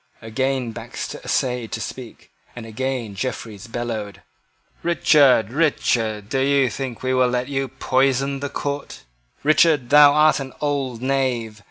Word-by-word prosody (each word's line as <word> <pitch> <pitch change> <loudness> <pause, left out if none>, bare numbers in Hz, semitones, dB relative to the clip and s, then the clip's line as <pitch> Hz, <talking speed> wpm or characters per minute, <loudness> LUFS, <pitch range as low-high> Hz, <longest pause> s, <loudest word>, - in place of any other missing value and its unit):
Again 130 +2 -1
Baxter - - -7
essayed 125 -3 -1
to - - -3
speak, 120 +1 -9 0.2
and 120 -2 -8
again 120 -1 -3
Jeffreys 110 -2 -5
bellowed 115 -4 -5 0.6
"Richard, 145 -9 +4
Richard, 115 -8 0
dost 135 +2 0
thou 140 -2 +3
think 125 +1 -6
we 130 0 0
will 130 -1 +3
let 125 0 -1
thee 135 0 -2
poison 135 +1 0
the 140 +1 -4
court? 145 +1 -5 0.4
Richard, 150 -4 +3
thou 145 0 +8
art 155 0 +4
an 130 -1 -7
old 135 -5 -2
knave. 125 -5 -1
130 Hz, 140 wpm, -21 LUFS, 115-140 Hz, 0.6 s, thou